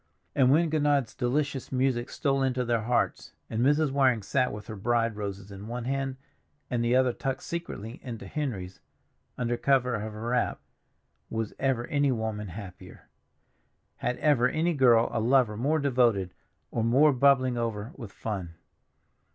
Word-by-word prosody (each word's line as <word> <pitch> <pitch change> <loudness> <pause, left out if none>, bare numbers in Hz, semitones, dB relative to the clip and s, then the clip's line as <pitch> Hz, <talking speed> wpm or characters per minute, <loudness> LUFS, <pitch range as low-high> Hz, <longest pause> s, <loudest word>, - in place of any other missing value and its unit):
And 130 -2 +4
when 160 +3 +3
Gounod's 145 -5 +1
delicious 135 +2 -1
music 130 -2 0
stole 135 -2 0
into 130 -1 0
their 115 -1 +1
hearts, 120 +2 -1 0.2
and 110 +1 -1
Mrs. 145 +1 +3
Waring 130 -5 +3
sat 125 +4 +1
with 105 0 -7
her 110 - -7
bride 115 +2 0
roses 100 -1 -6
in 100 +2 -9
one 120 +1 -4
hand, 135 0 -2 0.6
and 120 -1 0
the 120 +1 +2
other 130 -1 +3
tucked 135 +1 -3
secretly 125 - -6
into 120 -4 -7
Henry's, 105 - -4 0.6
under 120 -1 -1
cover 130 -2 +2
of 110 0 -3
her 110 +2 -5
wrap, 125 0 0 0.7
was 110 -1 -3
ever 130 -3 0
any 145 -3 +1
woman 110 -3 -3
happier? 95 0 -10 0.9
Had 125 +1 -2
ever 130 -5 +3
any 165 +5 +1
girl 120 -5 +5
a 115 - 0
lover 120 -1 +3
more 140 +8 +1
devoted 120 - +2 0.4
or 115 - -1
more 140 +6 +5
bubbling 130 -1 +4
over 115 -1 -3
with 115 -7 -9
fun? 95 -6 -5
125 Hz, 160 wpm, -28 LUFS, 110-135 Hz, 0.9 s, girl